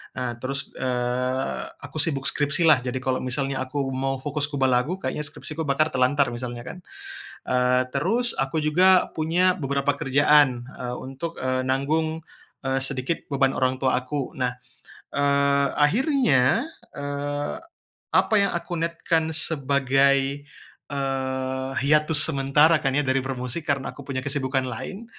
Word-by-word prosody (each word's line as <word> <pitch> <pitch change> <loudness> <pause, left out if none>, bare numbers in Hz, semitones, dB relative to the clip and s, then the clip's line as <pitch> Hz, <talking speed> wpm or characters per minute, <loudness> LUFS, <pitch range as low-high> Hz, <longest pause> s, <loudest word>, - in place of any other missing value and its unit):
Nah 120 -2 -4
terus, 135 +2 -3
eee, 125 +1 -2 0.2
aku 155 - -5
sibuk 145 -3 +1
skripsi 145 +4 +1
lah, 155 -5 +6
jadi 125 0 -5
kalo 130 0 0
misalnya 135 +1 -2
aku 135 +1 -2
mau 135 +1 -1
fokus 145 0 -1
kubah 135 -3 0
lagu, 125 +8 +1
kayaknya 190 - -4
skripsi 150 +1 -6
ku 160 - -2
bakar 155 +3 +1
terlantar 130 0 +2
misalnya 120 0 -6
kan. 150 +8 -8 0.6
Eee, 125 0 +2
terus 225 - +1
aku 140 +4 -1
juga 180 +5 +4
punya 180 +4 +1
beberapa 140 0 0
kerjaan, 140 -2 +4
e - - -8 0.2
untuk, 135 +6 -6
eee 130 0 -1
nanggung, 155 +4 0 0.4
eee, 135 0 0
sedikit 135 +3 -3
beban 135 -2 +2
orang 130 -1 0
tua 130 -1 +1
aku. 135 +1 -4
Nah, 125 -1 0 0.5
eee, 140 0 +2
akhirnya, 220 - +2 0.2
eee, 145 0 -3 0.6
apa 220 - +3
yang 200 0 +2
aku 175 0 -4
niatkan 165 -1 -1
sebagai, 140 -2 +1 0.4
eee, 130 -1 -2
hiatus 150 +1 +5
sementara 145 +4 +4
kan 135 - 0
ya 145 - +1
dari 130 +1 +1
bermusik, 130 +3 -4
karena 140 -1 -1
aku - - -11
punya 135 -2 -2
kesibukan 135 -2 -1
lain. 195 - -6
140 Hz, 145 wpm, -24 LUFS, 130-155 Hz, 0.6 s, lah